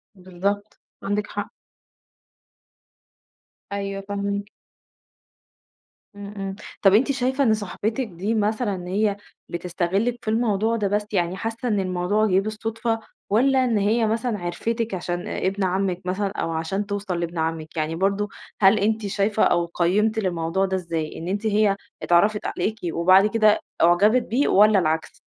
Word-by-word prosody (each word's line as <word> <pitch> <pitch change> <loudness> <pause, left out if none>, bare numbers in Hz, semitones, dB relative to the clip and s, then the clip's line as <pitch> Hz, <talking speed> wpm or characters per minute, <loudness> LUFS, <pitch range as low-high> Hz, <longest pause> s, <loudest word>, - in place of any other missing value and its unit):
بالضبط، 195 +3 -3 0.2
عندِك 205 +1 -1
حق. - - -5 2.2
أيوه 195 0 -3
فاهماكِ. 200 0 -3 1.7
إمم، 205 0 -8
إمم، 195 0 -4 0.3
طب 195 -1 +6
أنتِ 265 +6 +4
شايفة 265 +1 0
إن 220 -4 +4
صاحبتِك 220 +4 -2
دي 195 +4 -3
مثلًا 205 -4 -1
هي 205 +2 +1 0.3
بتستغلِك 180 +7 -1
في - - -17
الموضوع 220 0 +1
ده 210 -3 0
بس 205 +1 0
يعني 180 0 0
حاسة 230 +2 -4
إن 210 -3 +1
الموضوع 185 +3 +1
جِه 190 -2 +3
بالصدفة، 225 +2 -2 0.3
والّا 260 +4 +3
إن 230 -3 +1
هي 220 +3 +2
مثلًا 225 -1 -1
عرفتِك 225 +6 -2
عشان 175 -1 -3
آآ، - - -2
إبن 195 +1 -1
عمِك 185 0 0
مثلًا 195 +2 -1
أو 165 - -1
عشان 165 +6 -2
توصل 200 -3 -3
لإبن 170 0 -4
عمِك 160 0 -3
يعني 155 +1 -1
برضه 200 +3 0 0.3
هل 195 +2 +6
أنتِ 215 +1 0
شايفة 205 +2 +1
أو 170 0 +3
قيمتِ 205 +6 +1
للموضوع 180 0 0
ده 190 0 -1
ازاي 165 -4 -3
إن 165 - -6
أنتِ 205 +3 -2
هي 210 -1 +3 0.3
اتعرّفت 205 +5 +3
عليكِ 220 +1 -2
وبعد 185 +4 +5
كده 215 -1 +3 0.2
اُعجبت 200 +9 +5
بيه 260 +6 +1
والّا 210 0 +5
العكس؟ 160 -1 -1
200 Hz, 145 wpm, -23 LUFS, 180-215 Hz, 2.2 s, طب